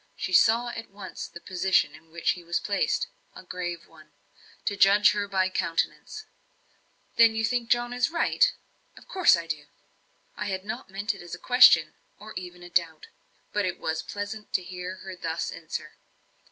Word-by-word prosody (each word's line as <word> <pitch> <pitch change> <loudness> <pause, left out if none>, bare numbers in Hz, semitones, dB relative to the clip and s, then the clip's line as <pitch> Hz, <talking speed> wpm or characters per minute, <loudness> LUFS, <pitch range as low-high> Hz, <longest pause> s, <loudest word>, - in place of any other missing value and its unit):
She 185 - -4
saw 230 +5 +5
at 230 -1 -7
once 195 -1 -8
the - - -11
position 185 -4 +1
in 160 +1 -16
which 170 +1 0
he 175 - -6
was 170 0 -1
placed; 200 -1 0 0.3
a - - -10
grave 175 -2 -5
one, - - -19 0.5
to 205 - 0
judge 200 +1 +6 0.2
by 190 -1 +2
her - - -8
countenance. 170 - -2 0.9
"Then 230 -1 +6
you 225 0 +1
think 240 0 -1
John 240 0 +2
is 250 +4 +1
right?" 345 +9 +3 0.5
"Of - - -15
course 370 - +5
I 170 - -5
do." 155 -3 -4 0.7
I - - -4
had 190 -1 -3
not 220 +1 -6
meant 205 +3 -2
it 195 - -11
as 175 0 -7
a - - -12
question, 210 -8 +6 0.2
or 215 +2 -11
even 180 -1 -8
a 175 - -10
doubt. 165 -3 0 0.4
But 205 -1 +1
it 180 - -2
was 160 0 -2
pleasant 205 +1 -6
to 185 - +1
hear 180 +1 -6
her 190 -1 -6
thus 165 -2 -3
answer. - - -6
190 Hz, 180 wpm, -27 LUFS, 175-220 Hz, 0.9 s, judge